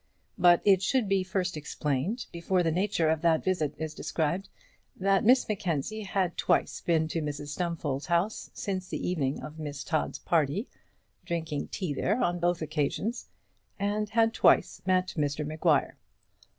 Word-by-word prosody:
But 175 -1 +6
it 195 -3 +5
should 245 +3 +1
be 195 -1 +2
first 185 -1 -2
explained, 150 - -2
before 175 +2 0
the 165 - +1
nature 180 -1 +1
of 160 -1 +1
that 165 -2 +3
visit 160 -6 0
is 160 0 -4
described, 170 +4 -2 0.5
that 195 0 +2
Miss 250 +4 +5
Mackenzie 195 0 -2
had 195 -3 -1
twice - - +1
been 160 -2 +2
to 165 - -1
Mrs 145 -1 -4
Stumfold's 155 -4 -3
house 175 +5 0
since 185 -2 -4
the - - -3
evening 145 -7 -1
of 155 +1 -8
Miss 145 -2 -5
Todd's 155 -2 -1
party, 165 - 0 0.6
drinking 160 -4 -3
tea 180 -7 -3
there 210 - 0
on 175 -4 +1
both 175 -1 +1
occasions, 155 - -2 0.5
and 205 +1 -1
had 225 0 +3
twice - - +3
met 185 0 +2
Mr 145 0 0
Maguire. 155 -1 +1
170 Hz, 155 wpm, -29 LUFS, 155-195 Hz, 0.6 s, But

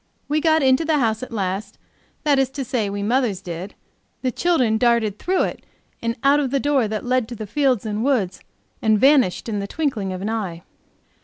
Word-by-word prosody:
We 300 +1 +1
got 315 -1 +3
into 260 +4 +4
the 315 -1 +1
house 225 -4 +1
at 255 - -7
last; 200 -1 -3 0.5
that 290 -3 +3
is 265 -2 +2
to 270 - -2
say, 225 -4 -1
we 200 0 -3
mothers 230 -3 +1
did; 180 +1 -7 0.5
the 255 - +1
children 250 -8 +1
darted 230 -4 +2
through 370 +1 +1
it - - -4 0.4
and 230 0 -1
out 280 +2 +5
of 280 -3 0
the 275 +1 +1
door 275 -4 +2
that 215 +2 -4
led 250 -2 +1
to 240 - -7
the 215 - -6
fields 255 0 +1
and 215 +1 -2
woods, 225 -10 0 0.4
and 220 -1 +3
vanished 265 -9 +4
in 210 -3 -2
the 200 - -4
twinkling 240 -9 -2
of 185 0 -5
an 210 - -2
eye. 185 -7 -4
235 Hz, 210 wpm, -22 LUFS, 205-275 Hz, 0.5 s, out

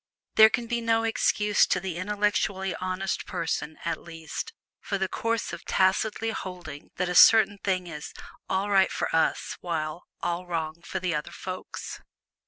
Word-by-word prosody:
There 220 0 +9
can 235 +1 -1
be 235 0 -1
no 225 0 +2
excuse, 210 -2 +3
to 180 - +1
the 180 -2 -4
intellectually 200 -1 0
honest 185 0 -2
person 160 -3 -2
at 170 - -1
least, 165 -2 -6 0.3
for 200 - -2
the 190 0 0
course 230 +3 -2
of - - -7
tacitly 215 +4 +1
holding 180 -8 -7
that 180 - -1
a 180 - -1
certain 205 +1 +7
thing 185 -2 0
is 150 -3 -7 0.4
"all 195 +2 0
right 195 -1 +5
for - - -1
us," 160 - +1
while 160 -1 -3 0.2
"all 175 +1 -2
wrong 165 -1 -3
for - - -4
the 180 -2 -1
other 150 +2 -2
folks." 185 +2 -7
185 Hz, 165 wpm, -27 LUFS, 170-205 Hz, 0.4 s, There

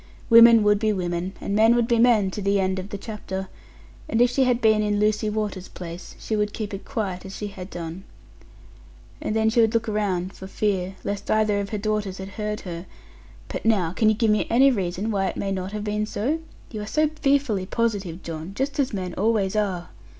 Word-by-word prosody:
Women 230 -1 +9
would 210 -1 +4
be 215 0 +2
women, 180 -1 -2
and 200 - -2
men 225 +2 +5
would 240 -1 +2
be 235 -2 +2
men, 225 -5 +4
to 205 - -5
the 200 0 +2
end 190 0 0
of 185 +2 -7
the 200 - -5
chapter; 190 -3 -6 0.6
and 225 - +1
if 245 0 +5
she 265 +1 +2
had 250 -2 +2
been 220 -2 +4
in 210 -1 0
Lucy 210 +1 +1
Water's 210 -3 -3
place, 175 0 -9
she 220 - -3
would 210 0 0
keep 215 -2 -5
it 195 - -6
quiet, 200 -8 -3
as 195 0 -8
she 210 - -4
had 185 -1 -9
done'; 170 +1 -6 1.2
and 215 - -2
then 220 0 +3
she 235 - +4
would 225 0 +2
look 230 0 +1
round, 195 -3 -1
for 190 - -9
fear, 190 -2 -1
lest 200 0 -4
either 215 -1 +2
of 200 0 -3
her 210 - -2
daughters 210 -2 -2
had 190 0 -7
heard 210 +1 -4
her; 175 -1 -7 0.6
'but - - -5
now, 195 -7 +2
can 215 +3 +3
you 215 - +3
give 225 -1 +2
me 210 - +1
any 270 +4 +5
reason, 195 0 -2
why 195 -2 +1
it - - -4
may 195 - -2
not 190 0 -3
have 210 0 -4
been 210 0 -1
so? 270 +11 -1 0.3
You 215 -3 -5
are 210 - -6
so 310 +6 +2
fearfully 275 -10 +2
positive, 200 -7 -2
John: 165 +3 -6
just 280 +4 -2
as 265 -4 +1
men 185 -3 -3
always 210 -2 +1
are.' 190 -5 -1
210 Hz, 225 wpm, -24 LUFS, 190-220 Hz, 1.2 s, Women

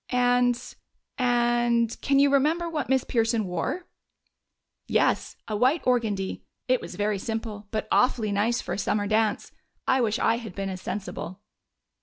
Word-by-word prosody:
"And 245 -1 +3 0.6
and 240 -1 +2
can 275 -1 +2
you 280 0 +5
remember 315 +5 +2
what 315 -5 -3
Miss 265 -1 +3
Pearson 225 -2 +1
wore?" 180 - -3 1.0
"Yes. - - +1
A 215 - -2
white 255 +9 +2
organdie. 220 -6 0 0.3
It 255 -1 +2
was - - -8
very 205 -1 0
simple, 220 -1 -5
but 215 0 -3
awfully 230 -4 +2
nice 220 +4 +1
for - - -4
a - - -3
summer 210 -1 0
dance. 215 0 0 0.4
I 260 0 +3
wish 220 -2 +1
I 230 - +2
had 220 -6 -8
been 195 -1 -3
as 185 -1 -6
sensible." 195 -2 -5
230 Hz, 155 wpm, -26 LUFS, 210-250 Hz, 1.0 s, you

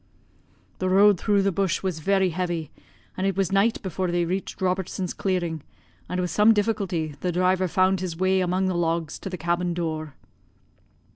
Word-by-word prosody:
The 185 - 0
road 200 0 +5
through 205 -2 +2
the 195 - +2
bush 195 0 -1
was 185 -4 -2
very 190 +2 +2
heavy, 170 -3 -3 0.4
and 190 +1 -1
it 195 -1 -1
was 195 -3 +1
night 200 +4 +2
before 185 0 -2
they 175 0 +1
reached 185 +3 -4
Robertson's 185 -1 -2
clearing, 175 -5 -2 0.5
and 180 - -2
with 180 -1 -1
some 215 +2 +5
difficulty 195 -7 -1
the 180 - 0
driver 185 +1 +2
found 185 +2 +2
his 175 -3 -4
way 185 +1 +2
among 185 +1 0
the 185 - 0
logs 165 -2 -1
to - - -6
the 180 - -5
cabin 175 +1 -1
door. 155 -4 -3
185 Hz, 180 wpm, -25 LUFS, 170-190 Hz, 0.5 s, road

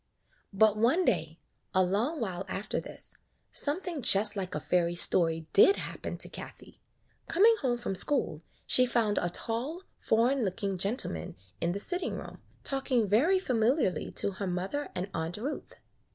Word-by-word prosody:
But 215 +1 +3
one 260 +12 +2
day, - - -1 0.4
a 185 - +5
long 220 - -1
while 190 -5 -3
after 195 +2 -3
this, - - -7 0.4
some 295 +4 +1
thing 345 -6 -5
just 205 -1 +5
like 190 -2 -4
a - - -2
fairy 175 +2 0
story 165 -2 +5
did 395 - +7
happen - - -5
to - - -3
Kathie. - - -11 0.5
Coming 430 +7 +5
home 245 -4 0
from 240 - -4
school, 185 - +1 0.2
she 255 0 +5
found 220 -4 +1
a 175 - -1
tall, 250 - -3 0.2
foreign 240 +4 +1
looking 195 0 -3
gentleman 185 - -2 0.3
in 170 +1 0
the 200 - -4
sitting 360 - -2
room, - - -9 0.2
talking 260 -5 +1
very 275 - +3
familiarly 250 - 0
to 200 - +1
her 195 +1 -5
mother 190 +11 -3
and 180 +1 -3
Aunt 165 +3 -4
Ruth. 270 +8 -6
215 Hz, 160 wpm, -29 LUFS, 185-270 Hz, 0.5 s, did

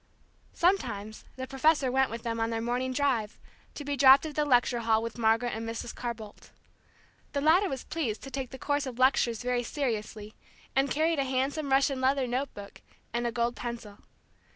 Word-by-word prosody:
Sometimes 230 - 0
the 260 - -5
professor 270 0 +2
went 265 +1 +2
with 230 +1 -6
them 230 -1 -2
on 225 0 0
their 225 -1 -2
morning 245 +3 -1
drive, 255 -5 0 0.4
to 290 - -7
be 285 0 -1
dropped 270 +2 +7
at 310 - -5
the 300 0 0
lecture 245 -3 +3
hall 225 -1 +2
with 230 +1 -6
Margaret 225 +2 +2
and 225 +1 -4
Mrs. 230 +1 -5
Carr 240 -1 -4
Bolt. 215 -2 -12 0.8
The 285 - 0
latter 345 +6 +4
was 265 - -4
pleased 265 -10 -3
to 270 - -8
take 265 -2 -4
the 265 - -9
course 285 +1 -1
of 245 -2 -6
lectures 255 -3 +2
very 250 0 0
seriously, 220 -5 -4 0.4
and 270 +1 +2
carried 315 +1 +1
a - - +2
handsome 270 +3 -1
Russian 270 0 +2
leather 265 0 +2
note 255 +3 -2
book, 200 -1 -10 0.3
and 240 0 0
a - - -1
gold 235 +1 -1
pencil. 235 -4 -7
255 Hz, 195 wpm, -29 LUFS, 230-275 Hz, 0.8 s, dropped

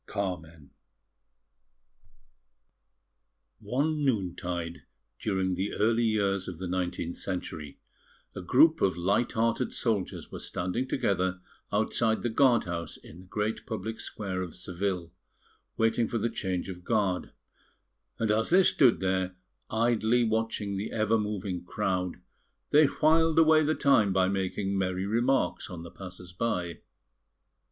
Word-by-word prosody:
CARMEN 85 -7 -5 2.9
One 150 +4 0
noon 100 -10 +1
tide, 85 -1 -4 0.4
during 95 -3 0
the 95 +3 -2
early 115 +2 +2
years 100 -3 +1
of 90 - -6
the 90 +1 -5
nineteenth 90 -1 -2
century, 80 -6 -5 0.6
a 95 - -5
group 155 - +5
of 95 -3 +2
light 100 +7 +1
hearted 115 +2 0
soldiers 110 -6 -2
were - - -6
standing 95 +9 -2
together 95 -7 0 0.3
outside 110 +1 +1
the 120 - 0
guard 125 0 +4
house 85 -1 -5
in 85 - -14
the 95 - -13
great 105 +3 -2
public 110 0 -4
square 95 -3 -4
of 90 -3 -6
Seville 90 -1 -3 0.7
waiting 115 +1 +2
for 120 - -2
the 115 +1 -1
change 95 -5 -2
of 90 -2 -8
guard; 100 -4 0 0.9
and 110 -2 +1
as 110 +1 +2
they 185 +2 +6
stood 130 - +4
there, 95 0 0 0.3
idly 115 +1 +2
watching 110 -3 -1
the 100 +3 -4
ever 110 0 +2
moving 100 -4 -3
crowd, 90 -1 -1 0.6
they 150 +1 +7
whiled 160 +2 +3
away 160 -1 +6
the 155 +1 +1
time 115 -8 +4
by 95 0 +3
making 95 +1 -1
merry 95 -1 -1
remarks 120 +6 +1
on 85 -3 -7
the 85 - -9
passers 90 -2 -10
by. 90 -5 -2
100 Hz, 135 wpm, -29 LUFS, 90-115 Hz, 2.9 s, they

